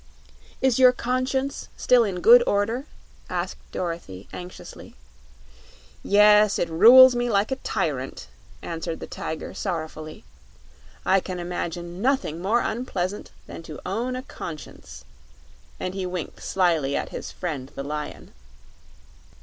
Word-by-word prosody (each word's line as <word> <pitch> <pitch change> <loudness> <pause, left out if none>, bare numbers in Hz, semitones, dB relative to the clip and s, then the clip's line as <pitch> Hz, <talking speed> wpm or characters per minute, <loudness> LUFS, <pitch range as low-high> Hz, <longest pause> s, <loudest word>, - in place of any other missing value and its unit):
"Is 260 -2 +3
your 255 -1 +8
Conscience 255 +2 -2
still 250 -1 +4
in 190 -5 -3
good 240 +5 +8
order?" 225 +7 0 0.4
asked - - -3
Dorothy, 165 - -5
anxiously. 180 0 -10 1.1
"Yes; 210 0 +5
it 170 - -1
rules 250 +9 +9
me 240 0 0
like 205 +2 +1
a 265 - 0
tyrant," - - -3 0.4
answered 165 0 -4
the - - -6
Tiger, 160 - -6
sorrowfully. 155 -4 -5 0.8
"I 195 - +4
can 185 -1 -6
imagine 175 0 -5
nothing 255 - 0
more 220 +6 +2
unpleasant 205 -5 -3 0.2
than - - -9
to 160 -2 -9
own 240 +6 -2
a 255 - -5
Conscience," 155 - -9 0.7
and 185 - -3
he 190 -1 -3
winked 180 -2 -6
slyly 165 -7 +1
at - - -2
his - - -7
friend 145 -7 -5
the 140 - -4
Lion. 150 +1 -6
190 Hz, 125 wpm, -24 LUFS, 165-240 Hz, 1.1 s, rules